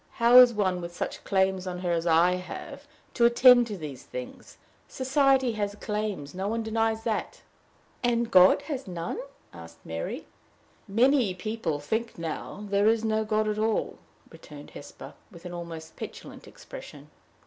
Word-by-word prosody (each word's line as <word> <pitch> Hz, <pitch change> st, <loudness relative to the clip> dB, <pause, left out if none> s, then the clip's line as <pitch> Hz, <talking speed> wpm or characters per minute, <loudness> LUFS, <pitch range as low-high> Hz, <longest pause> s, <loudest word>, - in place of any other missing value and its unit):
"How 235 Hz, +1 st, +5 dB
is 250 Hz, -1 st, +8 dB
one 190 Hz, -5 st, -1 dB
with 170 Hz, 0 st, -8 dB
such -, -, -5 dB
claims 190 Hz, -1 st, 0 dB
on 180 Hz, -1 st, -4 dB
her 175 Hz, -1 st, -1 dB
as 170 Hz, 0 st, -1 dB
I 165 Hz, +2 st, +4 dB
have, 180 Hz, -, -9 dB, 0.3 s
to 235 Hz, -, +3 dB
attend 245 Hz, 0 st, +6 dB
to 210 Hz, -3 st, -5 dB
these 145 Hz, -6 st, -8 dB
things? 125 Hz, 0 st, -9 dB, 0.3 s
Society 265 Hz, -1 st, +2 dB
has 205 Hz, -2 st, -3 dB
claims: 210 Hz, -9 st, -4 dB
no 190 Hz, +2 st, -3 dB
one 225 Hz, +2 st, -2 dB
denies 225 Hz, 0 st, -1 dB
that." 225 Hz, -3 st, -3 dB, 0.6 s
"And 235 Hz, -1 st, +1 dB
has 270 Hz, -, +4 dB
God -, -, -22 dB
none?" 170 Hz, -2 st, -5 dB, 0.3 s
asked 80 Hz, 0 st, -13 dB
Mary. 80 Hz, 0 st, -5 dB, 0.6 s
"Many 235 Hz, -1 st, +3 dB
people 185 Hz, -6 st, -3 dB
think 220 Hz, +10 st, -3 dB
now 165 Hz, +5 st, -6 dB
there 200 Hz, +1 st, +2 dB
is 225 Hz, 0 st, +2 dB
no 220 Hz, 0 st, +1 dB
God 215 Hz, 0 st, 0 dB
at 210 Hz, 0 st, -1 dB
all," 220 Hz, 0 st, -1 dB, 0.3 s
returned -, -, -13 dB
Hesper, -, -, -11 dB, 0.2 s
with 170 Hz, -1 st, -15 dB
an 175 Hz, -, -7 dB
almost 165 Hz, -2 st, -8 dB
petulant -, -, -9 dB
expression. -, -, -12 dB
210 Hz, 160 wpm, -27 LUFS, 175-230 Hz, 0.6 s, is